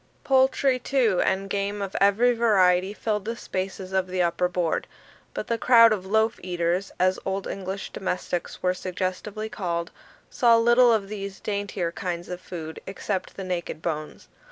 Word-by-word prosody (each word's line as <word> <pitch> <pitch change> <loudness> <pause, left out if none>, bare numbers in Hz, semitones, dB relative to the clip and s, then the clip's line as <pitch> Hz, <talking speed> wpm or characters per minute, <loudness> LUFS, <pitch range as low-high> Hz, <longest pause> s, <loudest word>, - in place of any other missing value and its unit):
Poultry, 265 0 +3
too, 240 -7 +2
and 195 +1 0
game 200 +1 -2
of 195 -1 -4
every 215 +5 +4
variety, 190 -5 +3
filled 210 -1 -2
the 230 +1 -3
spaces 190 -2 -5
of 190 -1 +1
the 185 0 -3
upper 175 +1 +2
board; 180 -2 -1 0.5
but - - -3
the 230 -1 -1
crowd 230 -2 +7
of 190 -3 -4
loaf 220 +3 +2
eaters, 175 +1 -1
as 185 +1 +2
old 195 0 -2
English 195 0 -5
domestics 180 -2 -4
were 180 0 +3
suggestively 185 +4 -4
called, 170 -5 -3 0.4
saw 235 -3 +4
little 240 +1 +5
of 215 -3 +1
these 200 -1 -6
daintier 200 -4 -2
kinds 175 0 -4
of 180 0 -6
food, 160 -3 -7
except 195 0 -4
the 195 - -4
naked 180 -3 -3
bones. 155 -2 -4
195 Hz, 160 wpm, -25 LUFS, 180-220 Hz, 0.5 s, crowd